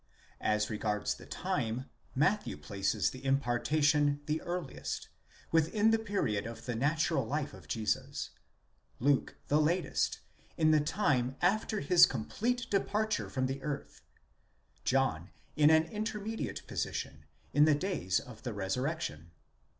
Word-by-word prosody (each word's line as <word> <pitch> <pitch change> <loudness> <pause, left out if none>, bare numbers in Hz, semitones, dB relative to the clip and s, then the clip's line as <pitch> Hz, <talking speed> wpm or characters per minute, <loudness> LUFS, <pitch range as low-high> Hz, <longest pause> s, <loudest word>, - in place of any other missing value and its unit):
As 105 +1 +1
regards 105 -1 -1
the - - -13
time, 120 +3 -2 0.3
Matthew 150 +10 +1
places 100 0 0
the 130 0 -10
impartation 145 +3 +2
the 155 +1 -1
earliest—within 175 - -1
the 225 - +3
period 150 - -1
of 115 - -8
the 125 - -2
natural 150 +4 +1
life 145 +4 -2
of 95 -6 -13
Jesus; 110 +6 -2 0.7
Luke, 140 +2 +2
the 150 +2 +4
latest— 170 +4 +1 0.4
in 155 -1 +4
the 155 - +5
time 145 -6 +1
after 215 +3 +1
his 170 +5 +7
complete 230 - -2
departure 210 +2 0
from 130 -1 -1
the 135 +1 -3
earth; 145 0 -5 0.8
John 130 -10 +1 0.3
in 150 -1 +6
an 160 0 +6
inter 210 +5 -3
mediate 220 +2 -4
position—in 75 - -1
the 155 -1 +5
days 145 - 0
of 115 -3 -12
the 120 -2 -4
resurrection. 100 - -2
145 Hz, 125 wpm, -32 LUFS, 115-170 Hz, 0.8 s, his